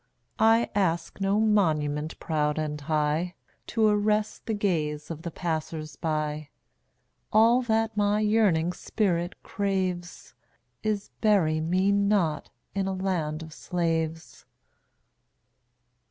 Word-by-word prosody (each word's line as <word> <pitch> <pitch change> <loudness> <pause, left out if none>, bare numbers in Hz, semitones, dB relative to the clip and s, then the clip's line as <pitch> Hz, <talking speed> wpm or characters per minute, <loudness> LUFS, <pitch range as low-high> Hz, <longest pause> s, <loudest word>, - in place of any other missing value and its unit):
I 225 +1 +5
ask 170 -2 -1
no 195 +2 +2
monument 155 -8 +1
proud 150 -2 0
and 150 -1 -3
high, 155 +4 0 0.3
To 225 -2 +1
arrest 210 0 +1
the 220 - 0
gaze 155 -7 -1
of 160 -1 -6
the 170 - -4
passers 155 -2 -4
by; 155 -1 -2 0.8
All 230 +3 +5
that 225 -2 0
my 205 0 +2
yearning 205 -6 +2
spirit 175 -4 -1
craves 185 -3 -3 0.5
Is, 210 -2 -2
Bury 185 -8 +3
me 185 +5 +2
not 200 -6 +1 0.2
in 195 -1 -1
a 195 - -1
Land 170 -5 -2
of 160 -1 -10
Slaves. 165 -2 -3
175 Hz, 110 wpm, -27 LUFS, 155-205 Hz, 0.8 s, I